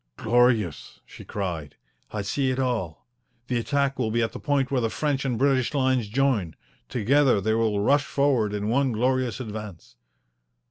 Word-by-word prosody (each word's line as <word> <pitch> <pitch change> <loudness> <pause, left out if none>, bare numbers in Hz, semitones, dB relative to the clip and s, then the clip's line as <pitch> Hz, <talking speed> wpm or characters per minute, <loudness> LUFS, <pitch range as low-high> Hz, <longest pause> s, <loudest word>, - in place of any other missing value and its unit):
"Glorious!" 115 -7 +1
she - - -12
cried. 85 -8 -5 0.3
"I 105 -2 -4
see 130 +7 0
it 130 - -1
all. 120 -12 -2 0.4
The 125 -1 -1
attack 140 +2 0
will 115 -3 0
be 115 +1 +1
at 110 - -1
the - - -8
point 140 -2 0
where 130 -2 +1
the 115 - 0
French 140 +1 -1
and 125 -3 -1
British 135 +1 +1
lines 130 -4 +1
join. 115 - 0 0.3
Together 130 0 +3
they 110 +3 0
will 110 -2 +1
rush 145 +7 +3
forward 135 -7 +1
in 105 0 -3
one 130 +2 +1
glorious 125 -1 0
advance." 105 - -8
120 Hz, 170 wpm, -25 LUFS, 105-135 Hz, 0.4 s, Together